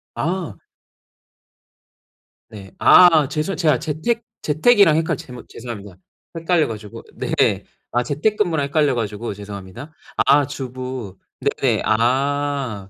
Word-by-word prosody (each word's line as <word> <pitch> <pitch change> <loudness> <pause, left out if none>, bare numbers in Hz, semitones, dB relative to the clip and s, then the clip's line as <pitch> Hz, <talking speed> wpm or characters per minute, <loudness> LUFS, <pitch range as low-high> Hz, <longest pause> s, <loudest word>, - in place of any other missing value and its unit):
아. 170 - -3 1.9
네. 100 -3 -11
아 160 -6 +6
죄송 155 +6 -2
제가 155 -7 +2
재택 215 +10 -2 0.2
재택이랑 165 +2 +4
헷갈 160 -3 0
제못 125 -1 -11
죄송합니다. 105 -6 -9 0.4
헷갈려 165 -1 +1
가지고 105 -2 -8
네. - - 0 0.3
아 120 0 +1
재택근무랑 160 - 0
헷갈려 145 -1 +1
가지고 110 -1 -4
죄송합니다. 100 - -10 0.3
아 140 +1 +5
주부 130 -7 -6 0.2
네네. - - 0
아. 130 -2 0
140 Hz, 240 characters per minute, -20 LUFS, 115-155 Hz, 1.9 s, 아